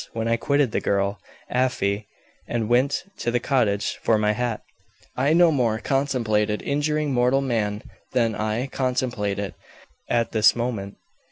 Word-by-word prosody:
When 115 Hz, 0 st, -2 dB
I 115 Hz, -, +3 dB
quitted 140 Hz, +1 st, +1 dB
the -, -, 0 dB
girl, 100 Hz, 0 st, 0 dB, 0.3 s
Afy, 105 Hz, -5 st, 0 dB, 0.4 s
and 115 Hz, -2 st, -1 dB
went 125 Hz, +4 st, +2 dB, 0.2 s
to -, -, -1 dB
the 120 Hz, +1 st, +1 dB
cottage 115 Hz, -6 st, 0 dB
for 110 Hz, -, +3 dB
my 105 Hz, 0 st, +2 dB
hat, 120 Hz, 0 st, -2 dB, 0.5 s
I 135 Hz, +4 st, +2 dB
no 170 Hz, 0 st, +6 dB
more 120 Hz, -6 st, +1 dB
contemplated 115 Hz, -6 st, 0 dB
injuring 150 Hz, 0 st, 0 dB
mortal 125 Hz, +2 st, +3 dB
man 110 Hz, -5 st, -1 dB, 0.3 s
than 115 Hz, -3 st, +1 dB
I 110 Hz, +4 st, -1 dB
contemplate 125 Hz, -6 st, -1 dB
it 100 Hz, -2 st, -4 dB, 0.6 s
at 115 Hz, -1 st, +1 dB
this 110 Hz, -1 st, +5 dB
moment. 115 Hz, -5 st, -3 dB
120 Hz, 150 wpm, -24 LUFS, 105-130 Hz, 0.6 s, no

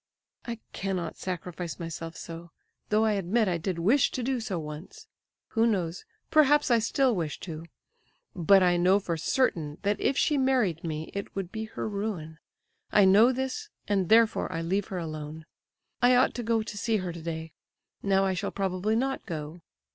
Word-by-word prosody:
"I 235 Hz, -1 st, -4 dB, 0.2 s
cannot 185 Hz, -4 st, -3 dB
sacrifice 180 Hz, -1 st, -5 dB
myself 165 Hz, -1 st, -6 dB
so, 170 Hz, +1 st, -8 dB, 0.4 s
though 215 Hz, +1 st, +3 dB
I 220 Hz, -, +3 dB
admit 205 Hz, +3 st, +1 dB
I 175 Hz, -2 st, 0 dB
did 180 Hz, +1 st, -2 dB
wish 225 Hz, +11 st, +3 dB
to 255 Hz, -, -2 dB
do 260 Hz, +1 st, 0 dB
so 220 Hz, -6 st, -3 dB
once. 150 Hz, +2 st, -8 dB, 0.4 s
Who 230 Hz, 0 st, +2 dB
knows, 185 Hz, -, -1 dB, 0.3 s
perhaps 295 Hz, -3 st, +5 dB
I 235 Hz, -, +5 dB
still 250 Hz, +2 st, +2 dB
wish 160 Hz, -5 st, -3 dB
to! 165 Hz, -2 st, -7 dB, 0.7 s
But 190 Hz, +2 st, +5 dB
I 175 Hz, -1 st, +4 dB
know 185 Hz, +3 st, +4 dB
for 175 Hz, -4 st, -2 dB
certain, 160 Hz, -, 0 dB
that 205 Hz, 0 st, 0 dB
if 275 Hz, -, +1 dB
she 295 Hz, -3 st, +2 dB
married 250 Hz, -, +1 dB
me 155 Hz, -1 st, -4 dB
it 200 Hz, 0 st, -5 dB
would 190 Hz, -2 st, -4 dB
be 220 Hz, 0 st, -4 dB
her 220 Hz, -, -5 dB
ruin; 200 Hz, -7 st, -4 dB, 0.5 s
I 205 Hz, -, +6 dB
know 210 Hz, +6 st, +6 dB
this 265 Hz, -, -3 dB, 0.2 s
and 195 Hz, -4 st, +1 dB
therefore 225 Hz, -3 st, +4 dB
I 165 Hz, -2 st, -2 dB
leave 190 Hz, +4 st, 0 dB
her 185 Hz, -, -5 dB
alone. 155 Hz, -1 st, -6 dB, 0.6 s
I 250 Hz, +1 st, +6 dB
ought 250 Hz, -, +4 dB
to 245 Hz, -, -4 dB
go 225 Hz, -1 st, +1 dB
to 215 Hz, -1 st, -7 dB
see 225 Hz, 0 st, +1 dB
her 185 Hz, -3 st, -4 dB
today; 160 Hz, -1 st, -6 dB, 0.5 s
now 195 Hz, -1 st, +2 dB
I 190 Hz, -, +1 dB
shall 180 Hz, -, -2 dB
probably 195 Hz, +2 st, -1 dB
not 265 Hz, +3 st, -1 dB
go. 160 Hz, -1 st, -6 dB
195 Hz, 180 wpm, -28 LUFS, 170-225 Hz, 0.7 s, I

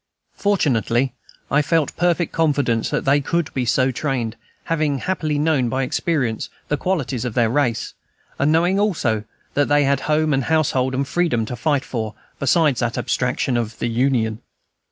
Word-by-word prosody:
Fortunately, 130 Hz, -, +1 dB, 0.4 s
I 150 Hz, -, +4 dB
felt 160 Hz, 0 st, 0 dB
perfect 175 Hz, -1 st, +1 dB
confidence 140 Hz, -8 st, +1 dB
that -, -, -2 dB
they 140 Hz, +2 st, +4 dB
could 170 Hz, +3 st, -1 dB
be 130 Hz, -2 st, -1 dB
so 130 Hz, +2 st, +2 dB
trained, 125 Hz, -4 st, -2 dB, 0.3 s
having 155 Hz, -4 st, 0 dB
happily 155 Hz, -1 st, -1 dB
known, 145 Hz, -5 st, +2 dB
by 130 Hz, +2 st, 0 dB
experience, 130 Hz, -4 st, -1 dB, 0.2 s
the 150 Hz, -, +2 dB
qualities 140 Hz, -7 st, -1 dB
of 125 Hz, -3 st, -4 dB
their 115 Hz, -3 st, +2 dB
race, 125 Hz, -4 st, 0 dB, 0.5 s
and 140 Hz, +2 st, +3 dB
knowing 175 Hz, +4 st, +3 dB
also 125 Hz, -, 0 dB, 0.3 s
that 145 Hz, 0 st, +2 dB
they 145 Hz, 0 st, +4 dB
had 140 Hz, -1 st, +2 dB
home 155 Hz, 0 st, +2 dB
and 135 Hz, -2 st, 0 dB
household 135 Hz, -5 st, +1 dB
and 135 Hz, +1 st, -1 dB
freedom 145 Hz, -9 st, +1 dB
to 125 Hz, -, -5 dB
fight 145 Hz, +2 st, 0 dB
for, 110 Hz, -3 st, -4 dB, 0.2 s
besides 140 Hz, -2 st, +3 dB
that 120 Hz, -1 st, -1 dB
abstraction 125 Hz, 0 st, 0 dB
of 115 Hz, -2 st, -2 dB
"the 120 Hz, -, -2 dB
Union." 115 Hz, -2 st, 0 dB
135 Hz, 165 wpm, -21 LUFS, 120-155 Hz, 0.5 s, I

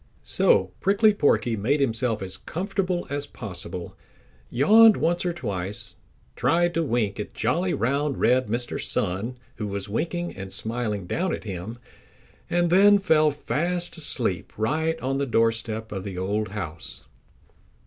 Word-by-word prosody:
So 95 Hz, -1 st, +3 dB
Prickly 205 Hz, +2 st, +4 dB
Porky 125 Hz, -, +2 dB
made 120 Hz, +9 st, +1 dB
himself 115 Hz, -4 st, 0 dB
as 95 Hz, -1 st, -6 dB
comfortable 185 Hz, 0 st, -2 dB
as 145 Hz, 0 st, -3 dB
possible, 90 Hz, -4 st, -6 dB, 0.5 s
yawned 215 Hz, -, +6 dB
once 175 Hz, +3 st, 0 dB
or -, -, +1 dB
twice, 100 Hz, -, -5 dB, 0.4 s
tried 175 Hz, +1 st, +2 dB
to 165 Hz, -, +1 dB
wink 120 Hz, -9 st, -1 dB
at 105 Hz, -, -6 dB
jolly, 170 Hz, +11 st, 0 dB
round, 140 Hz, +5 st, 0 dB
red 130 Hz, +1 st, +3 dB
Mr. 120 Hz, +3 st, -3 dB
Sun, 105 Hz, +8 st, -2 dB, 0.2 s
who 105 Hz, -2 st, -3 dB
was 100 Hz, -1 st, -4 dB
winking 175 Hz, -, -2 dB
and 95 Hz, 0 st, -7 dB
smiling 110 Hz, -4 st, -3 dB
down 175 Hz, -, -1 dB
at -, -, -10 dB
him 100 Hz, +2 st, -6 dB, 0.7 s
and 175 Hz, -1 st, +1 dB
then 205 Hz, +3 st, +7 dB
fell 155 Hz, -6 st, +3 dB
fast 170 Hz, +6 st, -2 dB
asleep 110 Hz, -, -2 dB
right 160 Hz, +9 st, 0 dB
on 135 Hz, +1 st, -1 dB
the 140 Hz, -, -1 dB
doorstep 115 Hz, -1 st, 0 dB
of 95 Hz, -3 st, -4 dB
the 95 Hz, -2 st, -6 dB
old 105 Hz, +3 st, -1 dB
house. 90 Hz, -5 st, -7 dB
125 Hz, 145 wpm, -25 LUFS, 105-170 Hz, 0.7 s, then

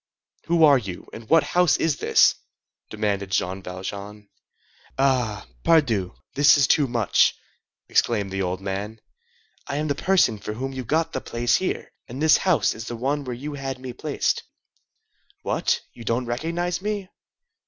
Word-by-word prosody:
"Who 170 Hz, -1 st, +3 dB
are 145 Hz, -3 st, +7 dB
you? 95 Hz, -6 st, -7 dB
and 110 Hz, -1 st, -10 dB
what 165 Hz, 0 st, +5 dB
house 180 Hz, -5 st, +3 dB
is 160 Hz, -3 st, 0 dB
this?" -, -, +4 dB, 0.6 s
demanded 100 Hz, -2 st, -2 dB
Jean 95 Hz, +1 st, -1 dB
Valjean. 100 Hz, +3 st, -7 dB, 0.7 s
"Ah! 125 Hz, -6 st, +1 dB, 0.2 s
pardieu, 115 Hz, -, +2 dB, 0.2 s
this 145 Hz, +1 st, +6 dB
is 140 Hz, -, +4 dB
too 145 Hz, 0 st, +3 dB
much!" 115 Hz, -4 st, +2 dB, 0.5 s
exclaimed 105 Hz, -4 st, +1 dB
the 95 Hz, 0 st, -2 dB
old 90 Hz, 0 st, -2 dB
man. 100 Hz, +3 st, -4 dB, 0.7 s
"I 140 Hz, -, -3 dB
am 150 Hz, +1 st, -1 dB
the -, -, +2 dB
person 145 Hz, -, +2 dB
for 105 Hz, -, -5 dB
whom 135 Hz, +4 st, -4 dB
you 130 Hz, -1 st, -5 dB
got 160 Hz, +7 st, 0 dB
the -, -, -2 dB
place 120 Hz, 0 st, +1 dB
here, 185 Hz, -, -3 dB, 0.2 s
and 125 Hz, +3 st, -8 dB
this 155 Hz, 0 st, +5 dB
house 185 Hz, -4 st, +2 dB
is 110 Hz, +1 st, -8 dB
the 120 Hz, -, -4 dB
one 140 Hz, +5 st, -1 dB
where 125 Hz, -2 st, -5 dB
you 145 Hz, +5 st, -6 dB
had 135 Hz, -2 st, -4 dB
me 130 Hz, -1 st, -7 dB
placed. 145 Hz, +3 st, -1 dB, 1.0 s
What! -, -, 0 dB
You 120 Hz, -, -11 dB
don't 115 Hz, +2 st, -1 dB
recognize 170 Hz, +9 st, -2 dB
me?" 205 Hz, -2 st, -3 dB
125 Hz, 165 wpm, -24 LUFS, 105-150 Hz, 1.0 s, are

